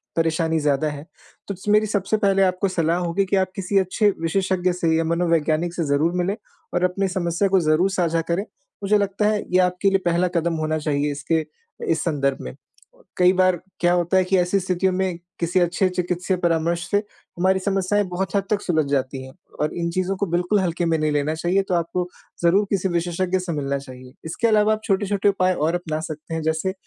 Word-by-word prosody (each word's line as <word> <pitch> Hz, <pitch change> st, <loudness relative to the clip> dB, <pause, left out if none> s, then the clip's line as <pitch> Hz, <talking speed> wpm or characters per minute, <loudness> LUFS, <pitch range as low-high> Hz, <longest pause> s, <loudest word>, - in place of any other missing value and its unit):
परेशानी 165 Hz, 0 st, +1 dB
ज़्यादा 145 Hz, 0 st, +1 dB
है। 145 Hz, +1 st, -8 dB, 0.4 s
तो 200 Hz, -, -4 dB
स 195 Hz, -, -14 dB
मेरी 210 Hz, +1 st, +4 dB
सबसे 205 Hz, +1 st, 0 dB
पहले 195 Hz, -2 st, +2 dB
आपको 185 Hz, +1 st, +1 dB
सलाह 170 Hz, -2 st, 0 dB
होगी 180 Hz, +2 st, 0 dB
कि 195 Hz, -, 0 dB
आप 190 Hz, -1 st, +1 dB
किसी 195 Hz, +1 st, -1 dB
अच्छे 200 Hz, +3 st, +2 dB
विशेषज्ञ 185 Hz, +2 st, 0 dB
से 165 Hz, -2 st, +1 dB
या 165 Hz, -, +1 dB
मनोवैज्ञानिक 165 Hz, 0 st, +1 dB
से 170 Hz, -, -2 dB
ज़रूर 145 Hz, +4 st, +1 dB
मिलें 195 Hz, +3 st, -1 dB, 0.4 s
और 175 Hz, -, 0 dB
अपनी 190 Hz, +2 st, +1 dB
समस्या 180 Hz, +1 st, 0 dB
को 190 Hz, -1 st, +3 dB
ज़रूर 175 Hz, +5 st, +3 dB
साझा 165 Hz, -1 st, +1 dB
करें। 180 Hz, +4 st, 0 dB, 0.4 s
मुझे 210 Hz, +1 st, +3 dB
लगता 200 Hz, +1 st, 0 dB
है 210 Hz, -1 st, 0 dB
ये 185 Hz, -, +5 dB
आपके 180 Hz, +2 st, 0 dB
लिए 195 Hz, 0 st, +2 dB
पहला 175 Hz, +1 st, +2 dB
कदम 170 Hz, 0 st, 0 dB
होना 155 Hz, 0 st, 0 dB
चाहिए 150 Hz, -1 st, -1 dB
इसके 155 Hz, +2 st, -1 dB, 0.5 s
इस 160 Hz, -, +1 dB
संदर्भ 140 Hz, -4 st, 0 dB
में। 65 Hz, 0 st, -7 dB, 0.6 s
कई 180 Hz, 0 st, +5 dB
बार 185 Hz, -1 st, +3 dB, 0.2 s
क्या 175 Hz, 0 st, +3 dB
होता 175 Hz, +2 st, +2 dB
है 185 Hz, -, +4 dB
कि 190 Hz, +1 st, +1 dB
ऐसी 180 Hz, +2 st, +2 dB
स्थितियों 185 Hz, 0 st, 0 dB
में 185 Hz, -2 st, -1 dB, 0.2 s
किसी 175 Hz, +2 st, +1 dB
अच्छे 175 Hz, +2 st, +2 dB
चिकित्सीय 180 Hz, +1 st, -1 dB
परामर्श 170 Hz, 0 st, 0 dB
से 205 Hz, -, +4 dB, 0.4 s
हमारी 190 Hz, +1 st, +2 dB
समस्याएँ 195 Hz, +1 st, +1 dB
बहुत 190 Hz, +3 st, -3 dB
हद 200 Hz, -, +2 dB
तक 210 Hz, -1 st, +1 dB
सुलझ 160 Hz, -4 st, +1 dB
जाती 130 Hz, -1 st, -1 dB
हैं 130 Hz, -, -11 dB, 0.3 s
और 150 Hz, -, 0 dB
इन 170 Hz, -1 st, -1 dB
चीज़ों 185 Hz, +2 st, -1 dB
को 200 Hz, -, 0 dB
बिल्कुल 180 Hz, +4 st, +1 dB
हल्के 175 Hz, -1 st, -1 dB
में 165 Hz, -1 st, +2 dB
नहीं 155 Hz, -1 st, 0 dB
लेना 145 Hz, +1 st, 0 dB
चाहिए 175 Hz, +4 st, +1 dB
तो -, -, +1 dB
आपको 175 Hz, +1 st, -1 dB, 0.4 s
ज़रूर 195 Hz, +5 st, +4 dB
किसी 190 Hz, -1 st, 0 dB
विशेषज्ञ 175 Hz, +2 st, 0 dB
से 180 Hz, -1 st, -4 dB
मिलना 140 Hz, -1 st, -1 dB
चाहिए। 130 Hz, -1 st, -12 dB
इसके 170 Hz, +8 st, -1 dB
अलावा 215 Hz, 0 st, +4 dB
आप 215 Hz, -, -4 dB
छोटे-छोटे 200 Hz, 0 st, +1 dB
उपाय 185 Hz, -2 st, +2 dB
और 165 Hz, +1 st, 0 dB
अपना 160 Hz, -3 st, -3 dB
सकते 160 Hz, 0 st, -7 dB
हैं 160 Hz, -, -2 dB
जैसे 160 Hz, +4 st, -1 dB
175 Hz, 210 wpm, -22 LUFS, 160-190 Hz, 0.6 s, ये